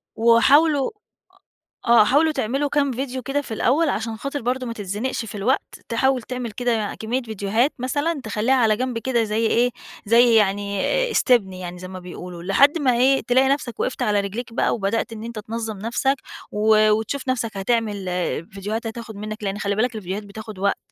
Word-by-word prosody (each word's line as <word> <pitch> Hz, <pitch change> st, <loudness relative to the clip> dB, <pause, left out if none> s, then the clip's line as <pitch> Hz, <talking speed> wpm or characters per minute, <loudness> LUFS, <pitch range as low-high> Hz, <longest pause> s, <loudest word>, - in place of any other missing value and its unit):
وحاولوا، 270 Hz, +6 st, +4 dB
أ -, -, -21 dB, 1.0 s
آه 235 Hz, -2 st, +8 dB
حاولوا 310 Hz, +6 st, +3 dB
تعملوا 275 Hz, +3 st, -1 dB
كام 280 Hz, -1 st, +1 dB
فيديو 260 Hz, +1 st, -4 dB
كده 285 Hz, +1 st, -1 dB
في 260 Hz, -, -7 dB
الأول، 280 Hz, +9 st, +2 dB
عشان 220 Hz, +3 st, -2 dB
خاطر 275 Hz, +4 st, -4 dB
برضو 250 Hz, +2 st, -1 dB
ما 230 Hz, -, -4 dB
تتزنقش 210 Hz, +4 st, -3 dB
في 215 Hz, 0 st, -8 dB
الوقت، 230 Hz, +7 st, -1 dB
تحاول 255 Hz, +2 st, +2 dB
تعمل 250 Hz, 0 st, -5 dB
كده 225 Hz, -2 st, -1 dB
كمية 240 Hz, +4 st, -1 dB
فيديوهات 220 Hz, +4 st, 0 dB
مثلًا، 290 Hz, +4 st, -1 dB
تخليها 220 Hz, +4 st, 0 dB
على 225 Hz, -4 st, +3 dB
جنب 250 Hz, -1 st, -2 dB
كده، 235 Hz, -1 st, 0 dB
زي 220 Hz, +1 st, 0 dB
إيه؟ 245 Hz, +2 st, +2 dB, 0.3 s
زي 235 Hz, +2 st, +5 dB
يعني 200 Hz, -1 st, +1 dB, 0.3 s
آآ، -, -, -4 dB
استبن 235 Hz, -, +3 dB
يعني، 180 Hz, -1 st, -7 dB
زي 185 Hz, -, -7 dB
ما 185 Hz, 0 st, -8 dB
بيقولوا، 180 Hz, -1 st, -9 dB
لحد 275 Hz, -, +4 dB
ما 270 Hz, -5 st, +2 dB
إيه؟ 265 Hz, +2 st, +4 dB
تلاقي 260 Hz, +2 st, +4 dB
نفسك 275 Hz, -4 st, -1 dB
وقفت 255 Hz, -, -2 dB
على 210 Hz, -4 st, +2 dB
رجليك 230 Hz, +5 st, -5 dB
بقى -, -, +1 dB
وبدأت 225 Hz, +2 st, -1 dB
إن 220 Hz, 0 st, -8 dB
أنتَ 230 Hz, -1 st, -6 dB
تنظم 220 Hz, 0 st, -5 dB
نفسك 235 Hz, +6 st, 0 dB, 0.4 s
و 215 Hz, 0 st, +4 dB
وتشوف 225 Hz, +6 st, -1 dB
نفسك 230 Hz, -5 st, -1 dB
هتعمل 210 Hz, -1 st, -1 dB, 0.5 s
فيديوهات 210 Hz, +4 st, -4 dB
هتاخد 225 Hz, -1 st, -7 dB
منك 215 Hz, +1 st, -6 dB
لأن 195 Hz, 0 st, -2 dB
خلي 200 Hz, 0 st, -1 dB
بالك 230 Hz, +2 st, 0 dB
الفيديوهات 200 Hz, 0 st, -4 dB
بتاخد 210 Hz, -1 st, -9 dB
وقت، 200 Hz, 0 st, +1 dB
230 Hz, 185 wpm, -22 LUFS, 210-255 Hz, 1.0 s, آه